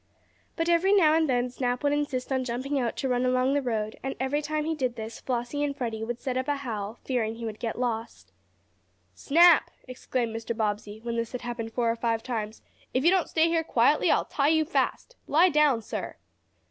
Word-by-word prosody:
But 330 -1 -1
every 345 +3 +3
now 325 -7 +5
and 320 -2 +2
then 245 -1 +1
Snap 250 0 -2
would 285 0 +2
insist 280 -3 -2
on 260 -1 0
jumping 260 +3 -2
out 240 -3 -2
to 270 - -1
run 250 -1 +1
along 255 +1 +2
the 285 - +2
road, 220 -4 -3
and 270 - -4
every 265 +3 0
time 305 0 -2
he 320 - 0
did 255 -6 -2
this 225 0 -7
Flossie 250 +3 -2
and 285 -1 -2
Freddie 225 -4 -3
would 240 +1 -4
set 255 0 -3
up 260 - -2
a 290 - +1
howl, 225 -5 -5
fearing 230 -4 -1
he 230 0 -7
would 215 -1 -6
get 230 -2 -3
lost. 230 -2 -4 0.8
"Snap!" 335 +2 +5 0.2
exclaimed 250 -2 -3
Mr. 225 0 -4
Bobbsey, 210 0 -2
when 235 -1 -3
this 230 +1 -3
had 250 - -4
happened 240 -2 -5
four 230 0 +1
or - - -2
five 230 -1 -1
times, 220 -3 -4 0.3
"if 260 +4 +1
you 340 - +7
don't 375 -3 +1
stay 320 0 +3
here 330 -1 +1
quietly - - +3
I'll - - +3
tie 280 -1 0
you 315 0 +3
fast. 385 +8 -1
Lie 335 +5 +5
down, 295 -7 +3
sir!" - - -5
255 Hz, 215 wpm, -27 LUFS, 230-290 Hz, 0.8 s, you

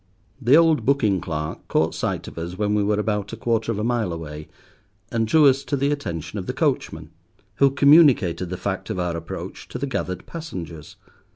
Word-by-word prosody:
The 130 +5 +6
old 165 -2 +4
booking 110 -10 +2
clerk 75 -1 -5
caught 80 - +1
sight - - -3
of - - -8
us 85 +2 -5
when 105 -1 0
we 105 - +2
were 105 +1 +1
about 105 0 -2
a - - -5
quarter 115 0 0
of 110 - -3
a 105 - -2
mile 115 -5 0
away, 75 -2 -7 0.6
and 115 -1 0
drew 155 +7 +5
to 140 - +8
us 135 +1 -4
the 140 0 0
attention 85 - -4
of 95 - -7
the - - -2
coachman, 80 0 -1 0.5
who 140 - +5
communicated 135 - +4
the 90 - -4
fact 100 +3 -4
of 110 - -3
our 90 -2 -1
approach 85 0 -7
to - - -6
the 135 - -2
gathered 90 -9 -4
passengers. 85 - -8
105 Hz, 200 wpm, -23 LUFS, 85-135 Hz, 0.6 s, to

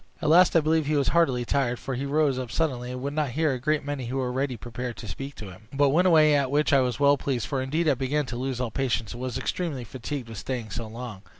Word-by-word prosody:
At - - 0
last 175 +3 +6
I 165 - +6
believe 155 -1 +1
he 155 - +1
was 140 -2 +2
heartily 135 -8 +2
tired, 125 -1 0
for 135 - -5
he 135 +3 -3
rose 145 -2 +2
up 125 -2 -5
suddenly, 125 -3 -1
and 125 0 -6
would 140 +1 -2
not 150 -2 0
hear 160 -3 +2
a 130 - -4
great 150 +2 0
many 145 -4 -3
who 130 +3 -3
were 125 -2 -1
ready 130 -1 -1
prepared 120 0 -6
to 110 - -8
speak 135 +8 -6
to 105 -3 -8
him, 100 +4 -15
but 140 0 +3
went 175 +6 +3
away, 155 -3 +6
at 140 -2 +2
which 145 +2 +2
I 140 - +6
was 125 -1 0
well 140 0 +5
pleased, 130 -6 -2
for 135 -2 -2
indeed 155 +6 0
I 145 - +5
began 135 +3 -1
to 125 - -6
lose 130 0 -3
all 125 -3 -2
patience, 120 -4 -1
and 120 - -8
was 130 -2 -3
extremely 155 -9 -3
fatigued 130 +2 -6
with 115 -3 -7
staying 120 -5 -4
so 115 +2 -4
long. 115 -3 -8
135 Hz, 280 wpm, -26 LUFS, 125-145 Hz, -, last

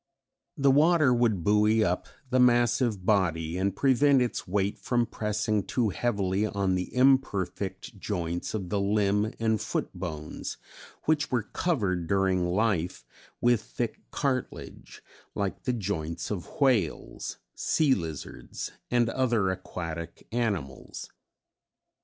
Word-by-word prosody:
The 140 -1 +4
water 155 -1 +5
would 115 -7 +2
buoy 105 +2 +4
up 90 -3 -1 0.2
the 130 - +3
massive 120 -4 +3
body 85 -6 +1
and 95 +1 0
prevent 135 +1 +4
its 125 -4 -1
weight 100 +2 0
from 120 -1 +1
pressing 105 -1 -1
too 115 +3 0
heavily 100 -2 0
on 100 -2 0
the 90 -1 -2
imperfect 105 -5 +1
joints 85 -2 -3
of 95 -4 -4
the 100 -1 0
limb 105 +1 +2
and 110 -2 +1
foot - - -2
bones, 80 -4 -6 0.5
which 150 -2 +1
were 120 -4 0
covered 100 - -1
during 95 -1 +2
life 95 -3 0 0.4
with 120 -2 +4
thick 115 +1 -4
cartilage, 130 -3 -4 0.3
like 100 -2 -3
the 125 - +1
joints 90 -7 -3
of 95 -5 -4
whales, 120 - 0 0.2
sea 150 -4 +2
lizards 80 - -5 0.2
and 120 -1 +3
other 115 -5 +1
aquatic 85 -3 -6
animals. 100 - -3
105 Hz, 125 wpm, -28 LUFS, 90-120 Hz, 0.5 s, water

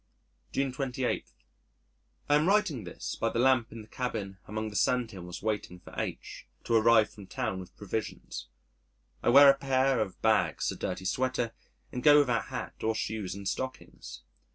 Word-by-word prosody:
June 135 -1 0
28. 130 -1 -2 1.0
I 145 - +4
am 150 +3 +3
writing 175 - +2
this 85 - -5
by - - 0
the - - -3
lamp 130 -1 +3
in 115 -1 -8
the - - -17
cabin 105 -6 -4
among 110 +1 -3
the - - -10
sandhills 100 -7 -1
waiting 105 -4 -2
for 90 - -14
H - - -5 0.2
to 115 - -2
arrive 115 -1 +5
from 100 -2 -12
town 95 -1 -3
with 90 -1 -11
provisions. 105 +2 -5 0.7
I - - +2
wear 140 +3 +9
a 140 - +8
pair 135 -2 +2
of 100 -4 -3
bags, 90 -9 +2
a - - -6
dirty 95 0 -4
sweater, 125 +2 0 0.4
and 125 - -4
go 145 +1 +7
without 125 -5 +2
hat - - -6
or 110 0 +1
shoes 105 -4 -3
and 100 -1 -6
stockings. 130 - -5
115 Hz, 170 wpm, -30 LUFS, 100-130 Hz, 1.0 s, wear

